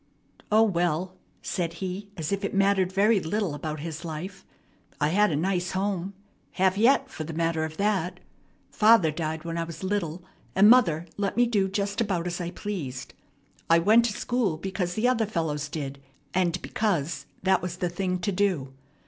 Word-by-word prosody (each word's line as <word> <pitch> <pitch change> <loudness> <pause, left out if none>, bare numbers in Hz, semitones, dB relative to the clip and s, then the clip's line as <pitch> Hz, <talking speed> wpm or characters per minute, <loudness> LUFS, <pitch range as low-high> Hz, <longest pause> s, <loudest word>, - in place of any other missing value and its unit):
"O, 215 +1 +6
well," 175 -2 0 0.3
said 170 -4 -2
he 190 +3 -5
as 160 0 -3
if 200 0 -1
it 200 - -2
mattered 195 -2 +3
very 205 +3 +4
little 190 0 -1
about 155 0 -5
his 160 +1 -6
life, 170 +4 -6 0.6
"I 150 - +2
had 205 +5 +3
a - - 0
nice 180 +3 -1
home 190 0 -2 0.4
have 190 0 +2
yet, 265 +6 +4
for 160 - -5
the 160 +1 -6
matter 165 -1 0
of 160 0 -8
that. 190 -4 0 0.5
Father 215 -7 +5
died 160 0 -3
when 165 0 -3
I - - 0
was 165 +1 -8
little, 185 -3 -2 0.3
and 195 +2 +7
mother 170 -10 +4
let 200 +1 -2
me 245 - +5
do 205 -5 +1
just 200 +3 -1
about 185 -6 -1
as 175 0 -3
I 170 - -3
pleased. 165 -10 -5 0.6
I 165 - +7
went 220 +7 +5
to 225 - -1
school 225 -8 -1
because 180 0 -3
the 220 +3 +2
other 230 -4 +2
fellows 155 -6 -2
did, 140 -3 -5 0.3
and 180 -1 +1
because 170 -8 -1 0.2
that 190 0 +3
was 175 -1 -4
the 180 - -1
thing 180 +1 -2
to 200 - 0
do. 180 -9 0
180 Hz, 180 wpm, -26 LUFS, 165-200 Hz, 0.6 s, and